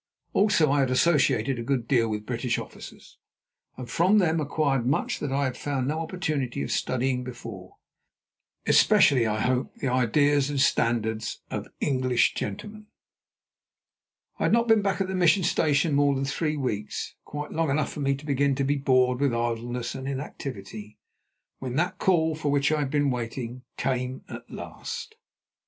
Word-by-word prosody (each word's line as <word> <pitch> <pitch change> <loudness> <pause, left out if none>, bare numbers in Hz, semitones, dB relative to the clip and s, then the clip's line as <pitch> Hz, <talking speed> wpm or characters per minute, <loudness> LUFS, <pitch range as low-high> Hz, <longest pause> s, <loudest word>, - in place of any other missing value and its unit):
Also 195 -8 +3
I 145 - +3
had 135 -2 +2
associated 130 -3 +2
a - - -3
good 120 -2 -1
deal 115 -4 +2
with 105 0 -3
British 120 0 -1
officers, - - -10 0.6
and 125 -1 -7
from 180 - +3
them 165 -5 +3
acquired 140 -3 0
much 130 +4 0
that 145 - -3
I 140 +1 +1
had 130 -2 -1
found 135 -3 -2
no 155 +3 -1
opportunity 155 -7 -2
of - - -4
studying 130 0 0
before, 115 -7 -9 0.9
especially, 125 -5 +5
I 110 0 -1
hope, 130 +1 0
the 135 - -2
ideas 140 +3 +2
and 145 -2 -2
standards 115 -4 0
of - - -4
English 130 -3 +2
gentlemen. 210 - -6 1.5
I - - +1
had - - +2
not 235 0 +3
been 225 -2 +5
back 195 -2 0
at 190 - 0
the 190 - -4
Mission 185 +1 +3
Station 155 -2 +2
more 140 0 +3
than 135 +1 -1
three 150 +2 -1
weeks, 110 -7 -3
quite 150 0 -6
long 165 -1 0
enough 145 +2 0
for - - -7
me 140 -1 +1
to 140 +2 -11
begin 140 -1 +1
to 140 - 0
be 145 +2 +1
bored 130 -2 +2
with 140 -4 +1
idleness 120 +1 -2
and 130 0 -6
inactivity, 115 -6 -6 0.6
when 130 -1 -4
that 180 +4 0
call 160 -4 +2
for 150 -1 -2
which 140 +1 +2
I 155 - +1
had 145 -2 -1
been 145 -1 +1
waiting 120 0 -4 0.2
came 130 -1 -2
at - - -9
last. 470 -1 -7
135 Hz, 170 wpm, -26 LUFS, 125-150 Hz, 1.5 s, especially